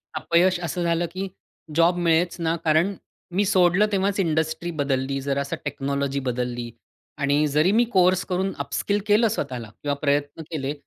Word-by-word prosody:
अपयश 175 Hz, +2 st, +2 dB
असं 175 Hz, +2 st, -2 dB
झालं 170 Hz, 0 st, +1 dB
की 190 Hz, +2 st, -4 dB, 0.5 s
जॉब 170 Hz, +2 st, +4 dB
मिळेच 170 Hz, 0 st, +2 dB
ना. 165 Hz, 0 st, +1 dB
कारण 160 Hz, +6 st, +3 dB, 0.4 s
मी 200 Hz, +3 st, +1 dB
सोडलं 185 Hz, +1 st, +4 dB
तेव्हाच 195 Hz, 0 st, 0 dB
इंडस्ट्री 160 Hz, 0 st, 0 dB
बदलली, 135 Hz, -2 st, -1 dB
जरा 140 Hz, 0 st, -1 dB
असं 140 Hz, -, -3 dB
टेक्नॉलॉजी 140 Hz, -1 st, -2 dB
बदलली 120 Hz, -2 st, -3 dB, 0.5 s
आणि 145 Hz, +1 st, +2 dB
जरी 150 Hz, +6 st, +3 dB
मी 235 Hz, +3 st, +4 dB
कोर्स 185 Hz, 0 st, +4 dB
करून 190 Hz, +1 st, -1 dB
अपस्किल 170 Hz, +9 st, -1 dB
केलं 215 Hz, +3 st, +4 dB
स्वतःला 125 Hz, -, -4 dB
किंवा 145 Hz, -1 st, 0 dB
प्रयत्न 145 Hz, +1 st, 0 dB
केले, 145 Hz, -2 st, -2 dB
160 Hz, 155 wpm, -24 LUFS, 140-180 Hz, 0.5 s, जॉब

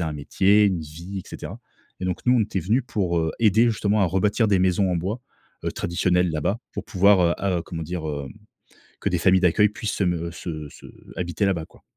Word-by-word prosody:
un 80 Hz, -2 st, -2 dB
métier, 100 Hz, +8 st, +3 dB
une 95 Hz, -5 st, +1 dB
vie, 85 Hz, +6 st, -8 dB
et -, -, -17 dB
cetera, -, -, -8 dB, 0.4 s
et 90 Hz, -, -3 dB
donc 90 Hz, -2 st, -2 dB
nous 125 Hz, 0 st, +5 dB
on -, -, +3 dB
était 100 Hz, -3 st, -2 dB
venus 110 Hz, +10 st, +1 dB
pour, 90 Hz, -7 st, 0 dB
heu, 80 Hz, -1 st, 0 dB
aider 110 Hz, +1 st, +4 dB
justement 105 Hz, -1 st, +1 dB
à 95 Hz, -, +4 dB
rebâtir 100 Hz, +5 st, +1 dB
des 100 Hz, -, +3 dB
maisons 95 Hz, +1 st, +2 dB
en -, -, +1 dB
bois, 95 Hz, +8 st, -3 dB, 0.4 s
heu, -, -, 0 dB
traditionnelles 90 Hz, 0 st, +1 dB
là-bas. 80 Hz, +8 st, -1 dB
Pour -, -, -5 dB
pouvoir 100 Hz, -1 st, +4 dB
heu 85 Hz, -1 st, +3 dB
ah 95 Hz, -2 st, 0 dB
heu, 85 Hz, -, -4 dB
comment 80 Hz, -2 st, -6 dB
dire? 80 Hz, 0 st, -4 dB
Heu, 70 Hz, -2 st, -4 dB, 0.7 s
que -, -, -1 dB
des 90 Hz, -, 0 dB
familles 95 Hz, +1 st, +4 dB
d'accueil 100 Hz, +4 st, +4 dB
puissent 105 Hz, +1 st, -4 dB
se 100 Hz, -, 0 dB
me 85 Hz, -2 st, -1 dB
se 80 Hz, -3 st, -6 dB
se -, -, -14 dB, 0.3 s
habiter 85 Hz, +2 st, -1 dB
là-bas, 90 Hz, -5 st, 0 dB
quoi. -, -, -22 dB
90 Hz, 225 wpm, -24 LUFS, 85-100 Hz, 0.7 s, nous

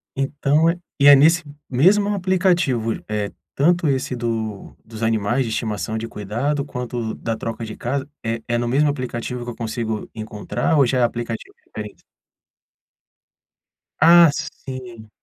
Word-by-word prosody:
Então, 145 Hz, +3 st, +1 dB, 0.3 s
e 140 Hz, -, +6 dB
é 145 Hz, -, +11 dB
nesse 160 Hz, +5 st, +5 dB, 0.3 s
mesmo 190 Hz, +11 st, +4 dB
aplicativo, 180 Hz, -, +1 dB
é 105 Hz, -1 st, -2 dB, 0.2 s
tanto 170 Hz, +3 st, +3 dB
esse 130 Hz, -2 st, 0 dB
do 115 Hz, -4 st, -4 dB
dos 110 Hz, -1 st, -10 dB
animais 115 Hz, +3 st, +1 dB
de 115 Hz, -, -4 dB
estimação 110 Hz, 0 st, -2 dB
de 115 Hz, +1 st, -4 dB
cuidado 120 Hz, +9 st, -2 dB
quanto 125 Hz, -4 st, -5 dB
o -, -, -5 dB
da 115 Hz, -1 st, -3 dB
troca 115 Hz, +1 st, -5 dB
de 110 Hz, -, -7 dB
casa, 135 Hz, +3 st, -3 dB, 0.2 s
é 115 Hz, 0 st, -2 dB
é 120 Hz, -, +1 dB
no 120 Hz, 0 st, -1 dB
mesmo 145 Hz, +4 st, +3 dB
aplicativo 125 Hz, -2 st, -4 dB
que 120 Hz, -, -6 dB
eu 115 Hz, -, -10 dB
consigo 110 Hz, -2 st, -3 dB
encontrar 110 Hz, +7 st, -2 dB
ou 140 Hz, -, +6 dB
já 125 Hz, +1 st, +1 dB
é -, -, +4 dB
aplicativo 120 Hz, -1 st, -3 dB
diferente? 105 Hz, -1 st, -9 dB, 2.0 s
Ah, 170 Hz, +1 st, +8 dB
sim. 130 Hz, -7 st, -7 dB
120 Hz, 150 wpm, -21 LUFS, 115-145 Hz, 2.0 s, é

